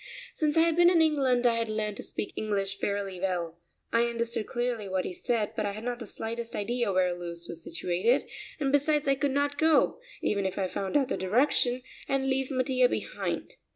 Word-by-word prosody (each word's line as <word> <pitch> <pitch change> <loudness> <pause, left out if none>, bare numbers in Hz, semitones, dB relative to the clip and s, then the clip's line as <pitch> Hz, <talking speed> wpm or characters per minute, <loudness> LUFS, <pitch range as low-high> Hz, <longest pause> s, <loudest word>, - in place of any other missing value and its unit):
Since 305 0 +2
I - - +7
had 330 -1 +3
been 345 0 +7
in 350 -2 +4
England 270 -6 +3
I 235 -1 +4
had 230 -1 -1
learned 215 -1 -2
to - - -5
speak - - -5
English 195 -2 -2
fairly 200 -2 -2
well. 175 -3 -2 0.3
I 230 +1 +4
understood 235 -1 -2
clearly 240 -4 -2
what 185 -1 -1
he - - -4
said, 220 +2 -1
but 220 - -1
I 200 - -3
had 215 +2 -7
not 245 0 -3
the 230 - -7
slightest 230 +3 -5
idea 235 +1 0
where 185 -1 +2
Lewes 170 -1 -7
was 165 -1 -7
situated, 180 +10 0 0.3
and 275 -2 +1
besides 290 +1 +2
I 275 - +5
could 280 +1 0
not 285 +1 0
go, 320 0 +4 0.2
even 200 -1 +1
if 190 - -5
I 195 - +1
found 195 +7 -1
out 270 -3 +1
the - - -1
direction, 245 +4 +2 0.2
and 275 0 0
leave 265 0 0
Mattia 255 -2 +2
behind. - - -3
235 Hz, 210 wpm, -29 LUFS, 200-270 Hz, 0.3 s, I